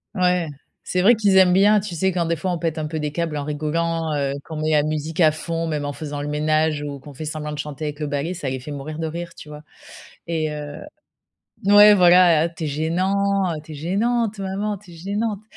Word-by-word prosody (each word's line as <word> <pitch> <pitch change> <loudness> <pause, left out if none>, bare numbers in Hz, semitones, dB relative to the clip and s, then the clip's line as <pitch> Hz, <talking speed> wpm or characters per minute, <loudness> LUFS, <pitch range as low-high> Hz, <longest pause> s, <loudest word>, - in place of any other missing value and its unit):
Ouais, 180 -2 +2 0.4
c'est 180 - -1
vrai 230 +5 +6
qu'ils 200 -3 +3
aiment 180 -1 +6
bien. 205 +2 +5
Tu 190 -3 -6
sais, 190 +4 +1
quand 170 -2 -1
des 170 - +1
fois, 185 +3 -2
on 175 - -2
pète 165 -1 -2
un 155 - -2
peu 155 +1 -4
des 150 -1 -2
câbles 165 0 -2
en 145 - -2
rigolant, 155 +2 -1
heu, 140 -1 -1
qu'on 160 - -7
met 155 - 0
la 150 -1 +4
musique 155 +2 -3
à 155 -2 +6
fond, 165 +2 -3
même 150 -3 -2
en 145 - -3
faisant 145 -1 -5
le 145 - -4
ménage 155 0 +1
ou 145 -1 -6
qu'on 140 +1 -13
fait 155 +4 -6
semblant 150 0 -4
de 150 - -6
chanter 150 0 -5
avec 150 0 -5
le 150 - -2
balai, 145 +5 -2
ça 145 - -5
les 130 0 -3
fait 125 - -10
mourir 150 +2 -6
de 160 - -2
rire, 170 +1 -6
tu 150 - -12
vois? 150 0 -10 0.6
Et 160 -2 -1
heu 150 -1 -6 0.9
ouais, 205 +1 +8
voilà. 175 -3 +6
«Tu 165 - -5
es - - -1
gênant, 165 +6 0 0.4
heu, 155 - -7
tu 155 - -10
es - - -8
gênante, 215 +7 -1
maman, 200 +2 -2
tu 190 -2 -17
es - - -12
gênante» 205 +4 -3
160 Hz, 245 wpm, -22 LUFS, 150-180 Hz, 0.9 s, ouais